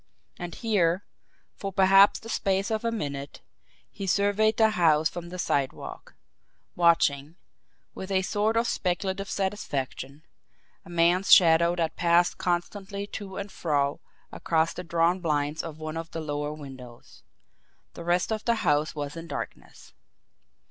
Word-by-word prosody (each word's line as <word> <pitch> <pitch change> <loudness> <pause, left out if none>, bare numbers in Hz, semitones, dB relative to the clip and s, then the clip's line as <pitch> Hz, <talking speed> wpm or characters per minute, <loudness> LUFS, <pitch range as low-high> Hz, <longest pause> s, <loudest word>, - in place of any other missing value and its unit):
And 175 -1 -6
here, 195 -5 +1 0.5
for 195 - -6
perhaps 195 +1 +6
the 225 - -12
space 195 -2 0
of 220 0 -1
a 230 - 0
minute, 140 -9 -5 0.5
he 195 - -6
surveyed 205 +3 +2
the 220 -1 +4
house 160 -5 +3
from 170 -1 -8
the 180 - -7
sidewalk 140 -6 -3 0.6
watching, 165 -3 +2 0.6
with 190 - -7
a 190 -1 +1
sort 210 +4 0
of 230 - +2
speculative 190 0 -2
satisfaction, 145 -7 -4 0.6
a 195 - -15
man's 175 +3 +2
shadow 170 0 +6
that 165 -2 -2
passed 175 0 +3
constantly 195 +3 -2
to 200 -2 -8
and 200 0 -5
fro 145 -3 -1 0.3
across 165 0 0
the 180 - -6
drawn 170 +1 +1
blinds 150 -3 -1
of 160 -2 -8
one 155 0 -5
of 165 0 -5
the 165 - -6
lower 145 -1 -3
windows. 130 -5 -11 0.7
The 170 - -9
rest 175 +4 +1
of 215 -1 -2
the 235 - +3
house 150 0 +1
was 145 0 -5
in 165 0 -8
darkness. - - -8
175 Hz, 145 wpm, -27 LUFS, 155-195 Hz, 0.7 s, perhaps